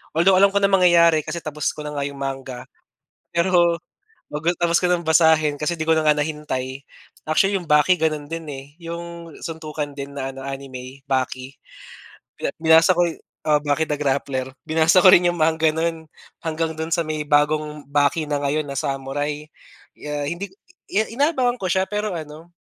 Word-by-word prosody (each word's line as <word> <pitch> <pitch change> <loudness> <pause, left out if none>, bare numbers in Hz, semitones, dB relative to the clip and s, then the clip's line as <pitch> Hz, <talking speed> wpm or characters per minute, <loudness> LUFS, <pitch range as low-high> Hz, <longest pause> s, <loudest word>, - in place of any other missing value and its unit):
Although 180 +4 +5
alam 200 - +7
ko 200 - -1
na - - +6
mangyayari 170 -4 +5
kasi 170 - -5
tapos 150 -1 -2
ko 150 - -9
na 150 - -5
nga 145 -1 -2
'yong 140 0 -5
manga, 135 -2 -5 0.7
pero 170 -1 +3 0.8
tapos 170 -1 +3
ko 180 - +2
ng 170 -2 -1
basahin 160 -2 +4
kasi 155 +3 -3
'di 160 - -3
ko 160 - +4
na 160 - +1
nga 150 - +6
nahintay. 145 -3 -3 0.4
Actually, 195 +6 +2
'yong 180 - -7
Baki 150 +5 +5
gano'n 155 -2 -1
din, 165 0 -5
eh, 135 0 -8
'yong 170 -1 -8
suntukan 155 -2 -5
din 140 0 -6
na 135 -1 -4
ano, 135 - -8
anime, 135 -1 -8
Baki. 130 0 -2 0.8
Bi - - -16 0.2
binasa 160 +2 +6
ko 175 - +2
oo. 160 -2 -1
Baki 145 +2 +1
the 150 - 0
Grappler. 135 -2 -1 0.2
Binasa 160 +3 +4
ko 185 - +8
rin 180 -1 +6
'yong 175 0 0
manga 160 0 +2
nun 165 0 -2 0.4
hanggang 160 0 -2
do'n 160 +1 -4
sa 170 - +1
may 155 -1 -3
bagong 150 +1 +1
Baki 145 +2 +1
na 145 - +1
ngayon 150 +2 +1
na 140 - -5
samurai, 145 +3 -3 0.6
ah, 150 0 -3
hindi 170 +5 -4 0.5
i 215 - +2
inaabangan 265 -4 +2
ko 185 - -2
siya, 190 +2 +2
pero 210 0 -2
ano, 155 +1 -9
155 Hz, 180 wpm, -22 LUFS, 145-170 Hz, 0.8 s, ko